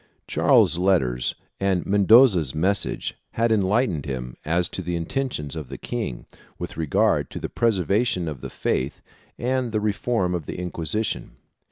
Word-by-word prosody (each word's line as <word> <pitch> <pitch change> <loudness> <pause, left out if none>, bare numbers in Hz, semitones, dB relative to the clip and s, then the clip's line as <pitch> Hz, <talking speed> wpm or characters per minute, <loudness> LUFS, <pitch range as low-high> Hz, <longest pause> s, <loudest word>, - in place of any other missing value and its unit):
Charles's 85 - +4
letters 65 -11 +1 0.2
and 95 -2 +1
Mendoza's 100 - +5
message 95 +6 0 0.2
had 115 0 +1
enlightened 100 - +1
him 60 -2 -5
as 85 +3 +1
to - - -4
the 90 -1 -3
intentions 85 - -3
of 75 -5 -6
the - - -6
king 110 - -4 0.3
with - - -6
regard 80 -3 +1
to - - -6
the - - -4
preservation 100 -3 +1
of 75 -5 -5
the - - -6
faith 65 +2 -2 0.3
and 125 -1 -1
the 110 - 0
reform 105 -2 0
of 85 -5 -3
the - - -5
Inquisition. 90 +4 -2
90 Hz, 150 wpm, -24 LUFS, 80-110 Hz, 0.3 s, Mendoza's